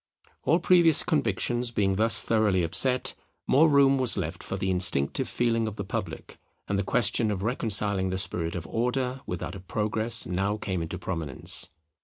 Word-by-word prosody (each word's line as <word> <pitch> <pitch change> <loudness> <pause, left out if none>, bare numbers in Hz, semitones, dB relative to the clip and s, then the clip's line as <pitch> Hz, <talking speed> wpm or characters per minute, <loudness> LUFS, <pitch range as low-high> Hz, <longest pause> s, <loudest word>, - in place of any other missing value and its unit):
All 165 - +3
previous 170 -4 +4
convictions 125 -6 -1
being 100 -4 0
thus 110 +3 +3
thoroughly 105 -5 +1
upset, 125 +10 0 0.3
more 155 +4 +4
room 140 -2 +4
was 125 -4 +3
left 85 -4 -4
for 95 - -5
the 95 0 -2
instinctive 90 -7 +2
feeling 115 -2 0
of 105 - -6
the 100 - -5
public; 100 -4 -6 0.3
and 100 0 -1
the - - -1
question 115 +1 +1
of 100 -2 -3
reconciling 105 -5 +2
the 95 - -3
spirit 85 -2 -3
of 85 -2 -5
Order 125 +6 -2
with 90 -1 -5
that - - -5
of 95 -2 -11
Progress 110 +2 0
now 95 +4 -2
came 95 -4 -4
into 80 +2 -5
prominence. 80 -7 -3
105 Hz, 175 wpm, -26 LUFS, 95-120 Hz, 0.3 s, previous